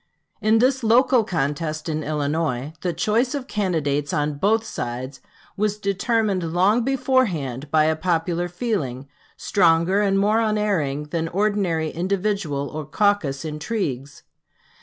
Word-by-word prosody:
In 215 Hz, +1 st, +4 dB
this 260 Hz, +3 st, +2 dB
local 240 Hz, +1 st, +4 dB
contest 155 Hz, -3 st, -2 dB
in 155 Hz, -1 st, -2 dB
Illinois, 150 Hz, -2 st, -2 dB
the 180 Hz, -, -1 dB
choice 225 Hz, -, 0 dB
of 275 Hz, -3 st, -4 dB
candidates 155 Hz, -, -1 dB
on 150 Hz, -1 st, -1 dB
both 220 Hz, +5 st, +2 dB
sides 130 Hz, -, -5 dB, 0.3 s
was 210 Hz, 0 st, 0 dB
determined 200 Hz, -3 st, 0 dB
long 200 Hz, +7 st, +3 dB
beforehand 220 Hz, -, 0 dB
by 155 Hz, +1 st, +4 dB
a 160 Hz, +1 st, +2 dB
popular 170 Hz, +1 st, -1 dB
feeling, 175 Hz, -, -3 dB, 0.3 s
stronger 175 Hz, +1 st, +3 dB
and 195 Hz, -1 st, +2 dB
more 210 Hz, +3 st, +3 dB
unerring 200 Hz, -10 st, 0 dB
than 165 Hz, +1 st, -1 dB
ordinary 185 Hz, -4 st, 0 dB
individual 180 Hz, -5 st, -1 dB
or 155 Hz, 0 st, -5 dB
caucus 160 Hz, -5 st, 0 dB
intrigues. 150 Hz, -, -4 dB
175 Hz, 125 wpm, -23 LUFS, 150-210 Hz, 0.3 s, In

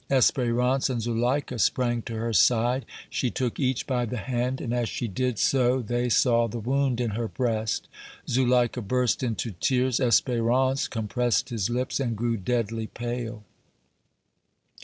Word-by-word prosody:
Espérance 125 Hz, 0 st, +2 dB
and 125 Hz, -2 st, -1 dB
Zuleika 120 Hz, +3 st, -1 dB
sprang 120 Hz, -1 st, +1 dB
to 115 Hz, -, -6 dB
her 115 Hz, +1 st, -2 dB
side; 120 Hz, +6 st, +3 dB, 0.2 s
she 125 Hz, -, -1 dB
took 125 Hz, -1 st, -3 dB
each 130 Hz, -3 st, 0 dB
by 125 Hz, -3 st, 0 dB
the 120 Hz, +1 st, -3 dB
hand, 125 Hz, +4 st, -2 dB
and 120 Hz, -, -3 dB
as 120 Hz, -2 st, 0 dB
she 120 Hz, -, -3 dB
did 125 Hz, +3 st, -1 dB
so 130 Hz, +1 st, +2 dB
they 120 Hz, +1 st, -1 dB
saw 115 Hz, 0 st, +3 dB
the 115 Hz, -, -5 dB
wound 130 Hz, +2 st, 0 dB
in 120 Hz, -3 st, 0 dB
her 115 Hz, +2 st, -2 dB
breast. 110 Hz, -3 st, -1 dB, 0.4 s
Zuleika 125 Hz, -1 st, +2 dB
burst 125 Hz, +3 st, 0 dB
into 115 Hz, -2 st, -2 dB
tears. 125 Hz, +6 st, +1 dB
Espérance 130 Hz, +2 st, +2 dB
compressed 120 Hz, +1 st, 0 dB
his 115 Hz, -5 st, -1 dB
lips 125 Hz, +3 st, -1 dB
and 120 Hz, -5 st, -1 dB
grew 115 Hz, +1 st, 0 dB
deadly 115 Hz, +1 st, -2 dB
pale. 120 Hz, -2 st, -5 dB
120 Hz, 150 wpm, -26 LUFS, 115-125 Hz, 0.4 s, side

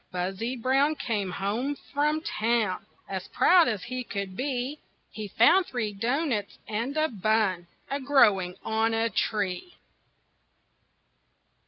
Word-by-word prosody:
Buzzy 190 Hz, +7 st, -3 dB
Brown 270 Hz, +5 st, +2 dB
came 220 Hz, -8 st, -2 dB
home 215 Hz, +10 st, -2 dB, 0.2 s
from 300 Hz, +2 st, +1 dB
town 225 Hz, -, 0 dB, 0.2 s
As 190 Hz, -2 st, -5 dB
proud 355 Hz, -2 st, +5 dB
as 210 Hz, -5 st, -2 dB
he 255 Hz, +1 st, -4 dB
could 200 Hz, -5 st, -5 dB
be, 260 Hz, +3 st, -2 dB, 0.3 s
He 215 Hz, -1 st, -6 dB
found 330 Hz, -, +4 dB
three 220 Hz, -5 st, -3 dB
doughnuts 230 Hz, 0 st, -1 dB
and 235 Hz, +7 st, -3 dB
a 310 Hz, 0 st, +3 dB
bun 210 Hz, -, 0 dB, 0.2 s
A 280 Hz, -, -1 dB
growing 210 Hz, -10 st, +3 dB
on 225 Hz, +1 st, +1 dB
a 225 Hz, 0 st, +1 dB
tree. 205 Hz, -, -2 dB
230 Hz, 125 wpm, -27 LUFS, 200-275 Hz, 0.3 s, proud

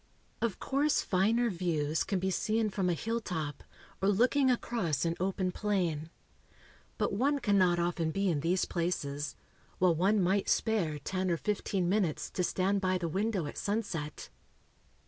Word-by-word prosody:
Of 230 Hz, -4 st, 0 dB
course 285 Hz, +2 st, +1 dB
finer 225 Hz, +5 st, +2 dB
views 160 Hz, -4 st, 0 dB
can 195 Hz, -, -1 dB
be 190 Hz, +1 st, 0 dB
seen 215 Hz, +3 st, 0 dB
from 190 Hz, -2 st, 0 dB
a 175 Hz, -, +1 dB
hilltop, 170 Hz, -, -3 dB, 0.4 s
or 195 Hz, -, +3 dB
looking 255 Hz, +6 st, +3 dB
across 210 Hz, -, 0 dB
an 165 Hz, 0 st, 0 dB
open 185 Hz, 0 st, 0 dB
plain. 175 Hz, -7 st, -1 dB, 0.9 s
But -, -, 0 dB
one 275 Hz, +8 st, +2 dB
cannot 190 Hz, -8 st, +3 dB
often 170 Hz, -1 st, 0 dB
be 195 Hz, +4 st, 0 dB
in 165 Hz, -5 st, +1 dB
these 175 Hz, +5 st, +1 dB
places, 150 Hz, -4 st, -2 dB, 0.4 s
while 180 Hz, -2 st, +4 dB
one 195 Hz, +6 st, +2 dB
might 190 Hz, +2 st, +1 dB
spare 190 Hz, -10 st, +1 dB
ten 185 Hz, +5 st, -2 dB
or 170 Hz, -, +1 dB
fifteen 195 Hz, -2 st, -1 dB
minutes 175 Hz, -6 st, 0 dB
to 180 Hz, -, -1 dB
stand 195 Hz, +3 st, +1 dB
by 185 Hz, -1 st, +1 dB
the 175 Hz, -2 st, -2 dB
window 195 Hz, +1 st, -1 dB
at 145 Hz, -, -6 dB
sunset? 170 Hz, -8 st, -3 dB
185 Hz, 155 wpm, -31 LUFS, 170-210 Hz, 0.9 s, while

